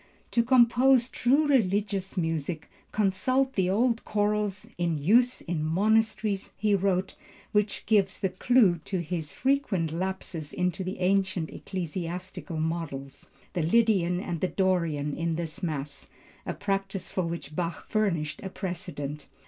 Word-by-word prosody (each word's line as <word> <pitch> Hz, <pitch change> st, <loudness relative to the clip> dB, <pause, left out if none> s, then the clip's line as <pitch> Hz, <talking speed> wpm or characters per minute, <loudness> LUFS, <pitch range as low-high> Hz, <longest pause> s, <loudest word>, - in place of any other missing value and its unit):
"To 235 Hz, -, +4 dB
compose 245 Hz, +1 st, +5 dB
true 280 Hz, +5 st, +3 dB
religious 200 Hz, -6 st, +1 dB
music, 165 Hz, -1 st, -2 dB, 0.2 s
consult 255 Hz, +7 st, +1 dB
the 185 Hz, -2 st, +1 dB
old 230 Hz, +4 st, +2 dB
chorals 210 Hz, -2 st, 0 dB
in 170 Hz, -2 st, +1 dB
use 235 Hz, -, +3 dB
in 165 Hz, -3 st, -2 dB
monasteries," 210 Hz, +3 st, +1 dB
he 210 Hz, +1 st, +2 dB
wrote, 190 Hz, -1 st, +1 dB, 0.4 s
which 210 Hz, 0 st, 0 dB
gives 200 Hz, -3 st, +2 dB
the 190 Hz, -, 0 dB
clew 190 Hz, -2 st, +3 dB
to 190 Hz, -, -2 dB
his 160 Hz, -2 st, -3 dB
frequent 255 Hz, -, 0 dB
lapses 175 Hz, -3 st, -4 dB
into 180 Hz, +1 st, -1 dB
the 185 Hz, +1 st, -4 dB
ancient 190 Hz, -3 st, +1 dB
ecclesiastical 180 Hz, -1 st, -5 dB
modes, 150 Hz, -4 st, -4 dB, 0.2 s
the 180 Hz, -, 0 dB
Lydian 180 Hz, -1 st, +3 dB
and 175 Hz, -3 st, -3 dB, 0.2 s
Dorian, 170 Hz, -7 st, +1 dB
in 165 Hz, 0 st, -1 dB
this 170 Hz, +3 st, -4 dB
mass, 145 Hz, -5 st, -4 dB, 0.4 s
a -, -, -2 dB
practice 195 Hz, -1 st, -2 dB
for 185 Hz, -, 0 dB
which 165 Hz, -3 st, -6 dB
Bach 170 Hz, 0 st, -3 dB
furnished 170 Hz, -9 st, 0 dB
a 195 Hz, -, -5 dB
precedent. 165 Hz, -6 st, -5 dB
190 Hz, 135 wpm, -28 LUFS, 165-210 Hz, 0.4 s, compose